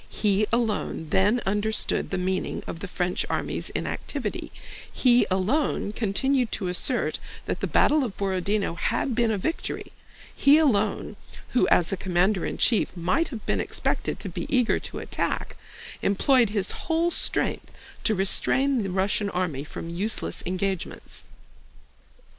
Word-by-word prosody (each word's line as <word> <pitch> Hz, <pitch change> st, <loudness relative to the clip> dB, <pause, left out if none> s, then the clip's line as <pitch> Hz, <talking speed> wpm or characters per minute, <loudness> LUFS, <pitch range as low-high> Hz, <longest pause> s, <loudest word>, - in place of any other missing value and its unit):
He 210 Hz, 0 st, +1 dB
alone 220 Hz, -8 st, -1 dB
then 205 Hz, +6 st, +3 dB
understood 210 Hz, +2 st, 0 dB
the -, -, -2 dB
meaning 185 Hz, +1 st, -2 dB
of 165 Hz, -, -6 dB
the 200 Hz, -, -5 dB
French 180 Hz, 0 st, -1 dB
army's -, -, -2 dB
inactivity, -, -, -4 dB, 0.4 s
he 245 Hz, -1 st, +4 dB
alone 200 Hz, +5 st, 0 dB
continued 245 Hz, +4 st, 0 dB
to 185 Hz, -4 st, -2 dB
assert 180 Hz, -, +1 dB, 0.3 s
that -, -, -2 dB
the -, -, -1 dB
battle 300 Hz, -1 st, +3 dB
of 230 Hz, -6 st, -4 dB
Borodinó 195 Hz, 0 st, 0 dB
had 235 Hz, +7 st, 0 dB
been 235 Hz, 0 st, +2 dB
a 215 Hz, -, 0 dB
victory, 320 Hz, -, -3 dB, 0.4 s
he 285 Hz, +2 st, +6 dB
alone—who 245 Hz, -2 st, 0 dB
as 175 Hz, +2 st, +3 dB
commander 185 Hz, +1 st, +1 dB
in -, -, -4 dB
chief 225 Hz, -5 st, +2 dB
might 185 Hz, -, +1 dB
have 225 Hz, -6 st, -8 dB
been -, -, 0 dB
expected -, -, -2 dB
to -, -, -5 dB
be -, -, -5 dB
eager 250 Hz, -5 st, +2 dB
to -, -, -7 dB
attack—employed 235 Hz, +4 st, -1 dB
his 200 Hz, -2 st, +1 dB
whole 335 Hz, +1 st, 0 dB
strength -, -, 0 dB, 0.3 s
to 220 Hz, -, +2 dB
restrain 260 Hz, +7 st, +3 dB
the 195 Hz, -, -3 dB
Russian 195 Hz, +2 st, +1 dB
army 175 Hz, -8 st, -2 dB
from 165 Hz, +2 st, -7 dB
useless 200 Hz, +6 st, -1 dB
engagements. 185 Hz, 0 st, -3 dB
205 Hz, 135 wpm, -26 LUFS, 185-245 Hz, 0.4 s, he